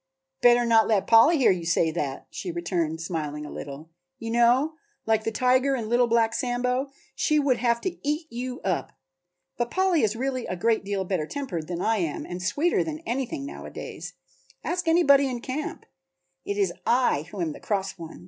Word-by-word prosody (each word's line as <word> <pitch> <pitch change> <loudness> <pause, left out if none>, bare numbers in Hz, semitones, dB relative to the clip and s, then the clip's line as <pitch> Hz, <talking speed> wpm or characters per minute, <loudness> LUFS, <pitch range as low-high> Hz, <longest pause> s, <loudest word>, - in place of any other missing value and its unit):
"Better 240 0 +5
not 225 -2 +4
let 210 -4 +2
Polly 235 +9 +6
hear 260 - +5
you 180 -2 -1
say 165 -1 +2
that," 145 -5 -4
she 185 - -5
returned, 170 -2 -2
smiling 150 -3 -4
a - - -8
little. 145 +3 -8 0.3
"You 230 -2 -5
know, 240 +6 +3 0.3
like 220 -1 +1
the 225 - 0
tiger 255 +4 +2
in 225 -4 -4
'Little 240 +1 +3
Black 230 -1 +2
Sambo,' 250 +2 -1 0.2
she 305 - +1
would 280 -4 +2
have 235 -1 +1
to 375 - -3
eat 300 +3 -1
you 250 +1 -5
up. 185 -3 -2 0.6
But 240 0 -1
Polly 370 -2 +2
is 215 0 +1
really 255 0 -2
a 185 - -3
great 225 +4 +1
deal 200 -1 -2
better 180 -5 -1
tempered 180 - -4
than 175 0 -3
I 225 0 +2
am 165 -6 -2
and 180 +1 -6
sweeter 295 - +1
than 315 0 -6
anything 270 +4 -3
nowadays; 280 - -8 0.5
ask 355 -1 -2
anybody 280 -5 +5
in 245 -2 -3
camp. 265 +5 -5 0.6
It 200 - -3
is 195 -4 +1
I 235 - +2
who 205 - -8
am 165 -3 -1
the - - -11
cross 195 -3 -2
one. 165 -1 -9
230 Hz, 190 wpm, -26 LUFS, 180-265 Hz, 0.6 s, Polly